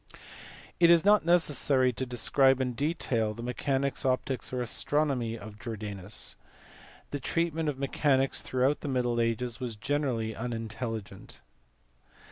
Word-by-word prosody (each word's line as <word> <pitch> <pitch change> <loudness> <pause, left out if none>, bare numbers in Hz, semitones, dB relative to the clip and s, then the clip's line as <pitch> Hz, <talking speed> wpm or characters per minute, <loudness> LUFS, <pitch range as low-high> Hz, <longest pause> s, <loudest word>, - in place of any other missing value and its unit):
It 170 -1 +6
is 170 +1 +6
not 205 -3 +5
necessary 145 -6 +3
to 130 +3 -4
describe 130 +2 +3
in 125 -1 -1
detail 120 -6 -1
the 115 - -7
mechanics, 135 +2 -1
optics, 130 0 -1
or 125 - -2
astronomy 125 -2 0
of 105 -1 -11
Jordanus. 105 -4 -5 0.8
The 145 - -3
treatment 165 +2 -1
of 140 - -3
mechanics 135 0 +1
throughout 130 +3 +1
the - - -5
middle 120 -3 +1
ages 115 +1 -1
was 125 -3 -4
generally 120 -3 -1
unintelligent. 115 -2 -5
130 Hz, 125 wpm, -29 LUFS, 115-145 Hz, 0.8 s, It